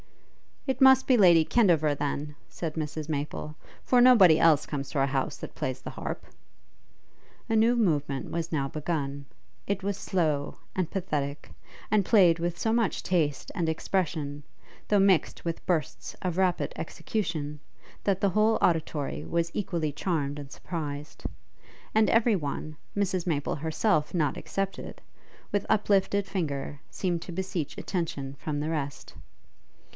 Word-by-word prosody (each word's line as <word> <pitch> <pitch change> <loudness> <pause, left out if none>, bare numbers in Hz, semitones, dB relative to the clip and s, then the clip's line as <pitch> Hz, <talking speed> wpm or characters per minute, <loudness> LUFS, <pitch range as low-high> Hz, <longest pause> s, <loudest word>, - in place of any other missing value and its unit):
'It 265 +1 -1
must 265 0 +7
be 255 - +4
Lady 175 -6 +7
Kendover, 165 -10 +3
then,' 145 +1 -3
said 165 -3 -4
Mrs 155 -1 -4
Maple, 150 0 -4 0.3
'for 250 -1 +4
nobody 200 -11 +7
else 155 -3 +5
comes 140 -2 -4
to 145 - -2
our 135 - +3
house 135 -1 -1
that - - -8
plays 130 0 -3
the - - -7
harp.' - - -5 1.2
A 225 - +2
new 225 +2 +4
movement 150 - 0
was 165 0 -3
now 140 -4 0
begun; 140 -2 -3 0.4
it 200 -1 -1
was 200 0 -1
slow 155 -6 -1 0.2
and 185 -3 0
pathetic, 150 -7 -3 0.4
and 210 -3 +3
played 180 -7 +5
with 170 0 -2
so 220 - 0
much 230 -4 +1
taste 160 -6 0
and 165 -3 0
expression, 155 -4 -2 0.4
though 205 - +4
mixed 195 -4 +2
with 165 -1 -3
bursts 165 -4 -1
of 180 -2 -1
rapid 185 -2 +1
execution, 155 -8 -3 0.4
that 195 -2 +1
the 200 - +3
whole 215 +3 +3
auditory 155 -4 0
was 170 0 -1
equally 170 -6 -1
charmed 145 -2 -2
and 140 -1 -9
surprized; 150 -2 -6 0.7
and 220 0 +4
every 230 -1 +4
one, 155 -1 -4 0.2
Mrs 185 -3 0
Maple 145 -4 0
herself 155 +1 0
not 150 -5 +1
excepted, 195 0 -4 0.5
with 205 -1 0
uplifted 200 -1 +2
finger 145 -7 -3
seemed 175 -3 -2
to - - -8
beseech 180 -4 -3
attention 145 -7 -3
from 150 -2 -3
the 150 +2 -2
rest. 145 -4 -4
165 Hz, 145 wpm, -28 LUFS, 150-195 Hz, 1.2 s, must